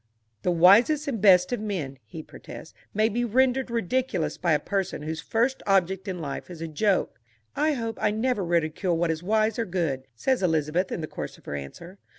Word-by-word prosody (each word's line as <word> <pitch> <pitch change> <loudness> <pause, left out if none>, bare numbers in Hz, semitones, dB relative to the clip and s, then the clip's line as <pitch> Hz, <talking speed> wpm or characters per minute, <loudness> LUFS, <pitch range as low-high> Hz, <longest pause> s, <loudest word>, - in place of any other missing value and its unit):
"The - - 0
wisest 215 - +5
and 230 -8 -2
best 180 -2 +6
of 245 - -1
men,"... 170 -11 -4
he 155 +9 -9
protests, 160 - -11 0.2
"may 215 +2 +2
be 235 +2 -1
rendered 255 +2 +2
ridiculous 235 -4 -1
by 175 -3 +1
a 150 - +3
person 195 -2 -3
whose 160 +1 -4
first 240 +4 0
object 190 0 +1
in 185 -2 -3
life 150 -1 -6
is 175 -3 -9
a 165 - -4
joke." 190 +5 0 0.4
"I 305 +1 +2
hope 230 -4 -4
I - - +3
never 220 0 0
ridicule 170 +1 0
what 170 0 +1
is 160 0 -4
wise 215 +4 +1
or 230 - 0
good," 160 -8 -2
says 260 - 0
Elizabeth 165 +1 0
in - - -3
the 155 - -4
course 75 - -7
of - - -23
her - - -5
answer. 120 - -8
185 Hz, 200 wpm, -26 LUFS, 165-225 Hz, 0.4 s, best